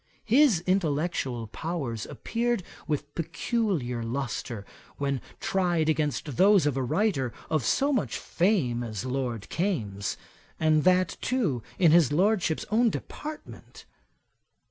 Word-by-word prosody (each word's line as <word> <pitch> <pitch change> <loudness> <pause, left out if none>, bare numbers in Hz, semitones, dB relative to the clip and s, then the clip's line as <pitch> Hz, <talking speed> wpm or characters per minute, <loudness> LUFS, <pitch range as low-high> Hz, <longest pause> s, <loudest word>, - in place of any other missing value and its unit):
His 235 - +5
intellectual 155 -9 0
powers 125 -3 -4
appeared 235 -3 -1 0.2
with 145 -1 -2
peculiar 165 - -1
lustre, 120 -3 -4 0.3
when 140 -2 -1 0.2
tried 175 -4 +1
against 150 -3 -1
those 195 -4 +6
of 145 -3 +1
a 135 - 0
writer 135 - +1 0.2
of 155 -5 +2
so 280 - +2
much 245 - 0
fame 170 - +1
as 110 -1 -4
Lord 125 -5 -3
Kames, 110 - -2 0.4
and 155 -1 +3
that 185 -1 +3
too 200 - 0 0.2
in 170 -4 +5
his 165 -4 +5
Lordship's 180 0 +2
own 230 +2 +4
department. 300 +7 -8
155 Hz, 120 wpm, -27 LUFS, 130-195 Hz, 0.4 s, those